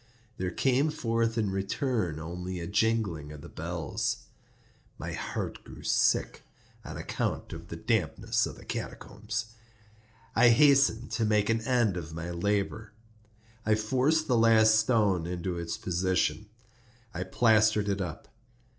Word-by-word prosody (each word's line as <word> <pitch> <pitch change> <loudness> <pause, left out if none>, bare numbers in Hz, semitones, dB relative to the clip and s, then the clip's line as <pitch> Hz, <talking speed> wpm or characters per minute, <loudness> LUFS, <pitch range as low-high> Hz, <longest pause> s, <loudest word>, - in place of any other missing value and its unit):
There 95 - -1
came 135 - +2
forth 115 -4 -1
in 105 -4 +1
return 95 - -1
only 90 +3 -5
a 85 - -4
jingling 100 -6 0
of 75 -1 -9
the - - -10
bells. - - -3 0.7
My - - -5
heart - - -4
grew - - -12
sick—on - - -1
account - - -3
of 85 +1 -9
the - - -6
dampness 110 - 0
of - - -8
the - - -14
catacombs. 110 +1 -5 0.8
I 120 +1 +6
hastened 135 -2 +4
to 110 +1 0
make 105 0 +2
an 115 0 +1
end 120 -7 +2
of 80 -2 -6
my 85 +1 -5
labor. 100 +4 -1 0.7
I 110 0 +3
forced 130 +9 +1
the 125 -3 +3
last 110 -1 +6
stone 105 -7 +2
into 90 0 -3
its 85 0 -4
position; 95 0 0 0.7
I 85 - -4
plastered 110 +1 +3
it 100 -1 0
up. 85 -4 -6
105 Hz, 135 wpm, -29 LUFS, 90-115 Hz, 0.8 s, I